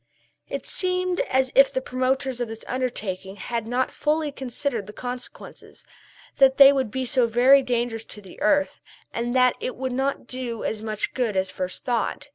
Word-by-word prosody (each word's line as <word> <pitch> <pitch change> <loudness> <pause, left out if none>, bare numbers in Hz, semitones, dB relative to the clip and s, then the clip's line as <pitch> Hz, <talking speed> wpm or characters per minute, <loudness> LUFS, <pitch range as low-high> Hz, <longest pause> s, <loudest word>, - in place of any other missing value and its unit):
It - - -4
seemed 365 -1 0
as 260 0 +2
if 275 0 +6
the - - 0
promoters 260 0 -1
of 240 - -1
this 225 0 -9
undertaking 210 -7 -3
had 230 +3 -4
not 250 +2 0
fully 305 0 0
considered 260 -4 -3
the 210 - -9
consequences 250 0 -8 0.5
that 270 -1 +5
they 275 0 +9
would 265 -4 0
be 260 +4 -3
so 245 0 +2
very 250 +4 +6
dangerous 240 -3 -1
to - - -7
the 190 -3 -14
earth, 285 +7 +2 0.3
and 240 +2 -2
that 250 -1 +5
it 255 - -4
would 260 0 -3
not 270 +1 -1
do 245 -2 -5
as 215 - -2
much 215 -1 -3
good 230 -6 -1
as 190 0 0
first 185 0 -5
thought. 240 -2 -1
250 Hz, 180 wpm, -24 LUFS, 225-265 Hz, 0.5 s, they